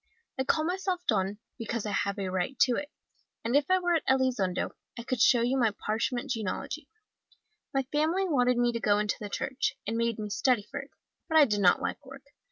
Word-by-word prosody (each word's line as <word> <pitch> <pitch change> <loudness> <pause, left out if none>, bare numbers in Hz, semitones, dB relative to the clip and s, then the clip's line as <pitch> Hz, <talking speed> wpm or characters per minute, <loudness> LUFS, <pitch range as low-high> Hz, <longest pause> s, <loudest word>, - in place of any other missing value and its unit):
I 265 - +1
call 310 - +2
myself 365 +1 -1
Don, 195 -1 +1 0.2
because 230 -1 -3
I 210 - -2
have 200 +1 -1
a 195 -2 -2
right 185 +8 -2
to 250 -2 +5
it, 290 +3 -4 0.6
and 235 +3 +1
if 290 +2 +3
I 370 - +5
were 350 -1 +1
at 325 - 0
Elizondo 250 -9 +1 0.3
I 235 - -5
could 250 -1 -2
show 240 -2 +6
you 260 +3 +1
my 225 -4 +2
parchment 240 +5 -1
genealogy. 235 - -4 0.8
My 270 0 +1
family 325 +6 +1
wanted 250 -6 +2
me 240 0 +3
to 230 - -3
go 205 -2 +3
into 210 0 0
the 210 - -6
church, 265 +6 -1
and 225 +2 -2
made 230 -1 0
me 210 -1 -5
study 245 +1 +2
for - - -3
it, 275 +1 -9 0.4
but 320 - +3
I 305 - +8
did 210 -5 0
not 180 - +4
like - - -3
work. 270 0 -12
245 Hz, 215 wpm, -29 LUFS, 210-285 Hz, 0.8 s, I